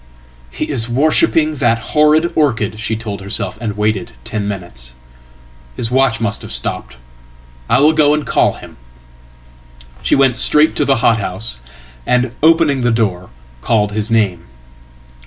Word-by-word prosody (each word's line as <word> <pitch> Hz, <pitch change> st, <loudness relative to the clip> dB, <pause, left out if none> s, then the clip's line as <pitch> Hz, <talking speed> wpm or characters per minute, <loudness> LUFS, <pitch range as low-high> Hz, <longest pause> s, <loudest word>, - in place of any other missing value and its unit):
"He -, -, -4 dB
is 115 Hz, 0 st, -2 dB
worshipping 155 Hz, +3 st, +2 dB
that 120 Hz, -3 st, +2 dB, 0.2 s
horrid 155 Hz, +2 st, +3 dB
orchid," 115 Hz, -8 st, 0 dB
she 110 Hz, 0 st, -2 dB
told 105 Hz, -3 st, -6 dB
herself, 100 Hz, 0 st, -1 dB
and 105 Hz, -3 st, -4 dB
waited 110 Hz, +2 st, -1 dB
tenminutes. 90 Hz, -, -6 dB, 0.8 s
"His 115 Hz, -, -3 dB
watch 130 Hz, -2 st, +2 dB
must 110 Hz, -2 st, -2 dB
have -, -, -9 dB
stopped. -, -, -4 dB, 0.7 s
I -, -, +4 dB
will 155 Hz, +2 st, +5 dB
go 150 Hz, -1 st, +3 dB
and 150 Hz, -, -3 dB
call -, -, +2 dB
him."She 60 Hz, 0 st, -9 dB
went 135 Hz, -3 st, +2 dB
straight 150 Hz, +4 st, +3 dB
to 145 Hz, -, +1 dB
the 135 Hz, -, +3 dB
hothouse, 105 Hz, -, 0 dB, 0.4 s
and, 125 Hz, -, 0 dB
opening 160 Hz, -4 st, +3 dB
the 120 Hz, -, +1 dB
door, 100 Hz, -6 st, -1 dB, 0.3 s
called 105 Hz, -, +1 dB
his 105 Hz, 0 st, -3 dB
name. 105 Hz, -6 st, 0 dB
110 Hz, 140 wpm, -16 LUFS, 90-135 Hz, 0.8 s, will